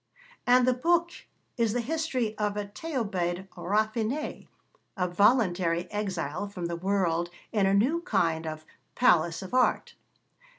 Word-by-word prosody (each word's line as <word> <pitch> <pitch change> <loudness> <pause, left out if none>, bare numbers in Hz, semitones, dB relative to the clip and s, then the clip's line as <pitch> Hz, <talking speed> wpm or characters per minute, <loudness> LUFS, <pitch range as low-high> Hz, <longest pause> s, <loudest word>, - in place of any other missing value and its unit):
And 250 0 +5
the 255 - +5
book 340 +6 +2 0.5
is 230 -3 +1
the 245 - 0
history 255 -4 -1
of 210 -1 -1
a 205 - -2
Thebaïde 200 - -3
raffinée 215 - -2 0.5
a 180 -1 +1
voluntary 180 -3 +2
exile 195 -4 -3
from 185 -3 -6
the 170 0 -2
world 175 -2 0 0.2
in 205 -4 +2
a 195 - +3
new 275 +12 +2
kind 165 - 0
of 155 0 -6 0.3
'Palace 170 -7 +3
of 190 - -9
Art.' 255 0 +2
205 Hz, 135 wpm, -28 LUFS, 175-245 Hz, 0.5 s, And